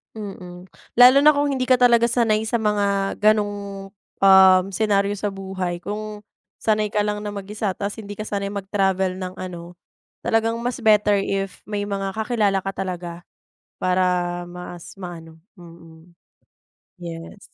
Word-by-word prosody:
Mhm, 185 -3 -9 0.3
lalo 250 +3 +8
na 300 +1 +6
kung 285 0 +1
hindi 260 -2 -1
ka 255 - +6
talaga 235 -1 +4
sanay 225 -2 +1
sa 235 - -1
mga 200 -3 0
ganong, 205 -2 0 0.3
um, 190 -1 +7
senaryo 200 -1 +1
sa 205 - -2
buhay, 190 -2 -4
kung 210 0 -5 0.4
sanay 215 -1 +1
ka 210 0 0
lang 210 0 -2
na 210 0 -5
mag-isa 200 0 -3
tas, 205 +2 -4
hindi 205 -1 -8
ka 215 - -5
sanay 200 -2 -3
mag-travel 190 -2 -1
ng 185 0 -5
ano, 175 -1 -8 0.5
talagang 225 +1 +1
mas 245 +1 -2
better 210 -2 +4
if 195 -1 -3
may 205 -1 -2
mga 195 -1 -3
kakilala 215 -3 +1
ka 195 - -2
talaga 180 -2 -4 0.7
para 185 0 +1 0.5
mas 175 0 -9
maano, 165 -3 -9 0.2
mhm, 165 -1 -15 0.9
yes. 170 +3 -8
200 Hz, 145 wpm, -22 LUFS, 185-215 Hz, 0.9 s, lalo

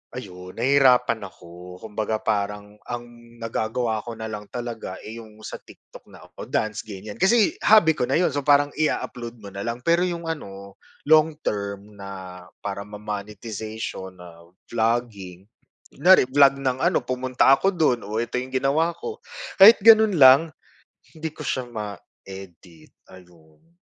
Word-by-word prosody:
ayun 90 -6 -9
nahirapan 125 -3 +3
ako. 90 -1 -13
Kumbaga 110 0 -3
parang 105 -1 -2
ang 120 0 -5 0.3
nagagawa 115 0 -2
ko 120 - -6
na 110 0 -6
lang 105 -1 -6
talaga, 120 -6 -6
eh, 110 - -8
yung 110 -1 -14
sa - - -7
TikTok - - -17
na - - -15
ako, - - -11
dance 110 -1 -1
ganiyan, 105 0 -9
kasi 210 +3 +3
hobby 205 -7 +6
ko - - 0
na - - +2
'yon, 180 - +3
so 145 - -1
parang 145 0 +4
i-a-upload 120 -6 -3
mo - - -8
na 100 - -6
lang, 115 +1 -3
pero 170 +3 +3
yung 170 -1 -5
ano, 100 -10 -7 0.3
long 155 0 +6
term 100 0 -4
na 95 -2 -9 0.2
para 100 0 -4
ma-monetization 105 -1 -7
na 85 -1 -14 0.2
vlogging, 110 -5 -2 0.4
kunyari 180 +6 +5
vlog 140 0 +5
ng 130 -1 -1
ano, - - +3
pumunta 130 0 0
ako 195 +7 +1
do'n, 145 -8 +2
oh, 110 +2 -2
ito 120 +1 -4
yung 130 +1 -9
ginawa 140 +6 +1
ko, 445 - -6 0.4
kahit 210 +4 +10
gano'n 220 -2 +7
lang, 130 +1 +9 0.7
hindi 160 0 -5
ko 155 - -9
siya 130 - -1
ma-edit, 95 -6 -11 0.2
ayun. 90 - -20
110 Hz, 150 wpm, -23 LUFS, 100-135 Hz, 0.7 s, kahit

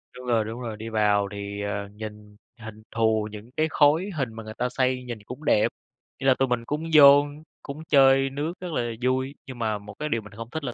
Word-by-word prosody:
đúng 125 - -10
rồi, 115 -3 +2
đúng 115 +3 -6
rồi. 115 -3 -5
Đi 110 +1 -6
vào 105 -2 +2
thì, 100 0 -5
ờ, 100 0 -3
nhìn 105 0 -10 0.2
hình 110 -1 -10
thù 110 -2 +1
những 105 +2 -10
cái 155 - +2
khối 155 +7 +3
hình 130 -6 -2
mà 115 0 -8
người 110 0 -8
ta 125 +1 0
xây 130 0 0
nhìn 120 -3 -6
cũng 125 +8 -9
đẹp. 105 - +4 0.5
Ý 135 - -2
là 130 - +7
tụi 135 - +3
mình 120 -2 -1
cũng 150 +5 -3
vô, 145 -1 +9 0.4
cũng 150 +2 -7
chơi 135 -1 +5
nước 145 +5 -3
rất 180 -1 -6
là 120 -4 -1
vui. 130 +2 0
Nhưng 130 -2 -9
mà 110 -2 0
một 105 0 -11
cái 150 - -2
điều 115 -5 0
mình 105 0 -14
không 115 +2 -8
thích 160 +2 -4
là 125 -3 -3
120 Hz, 240 wpm, -25 LUFS, 110-135 Hz, 0.5 s, vô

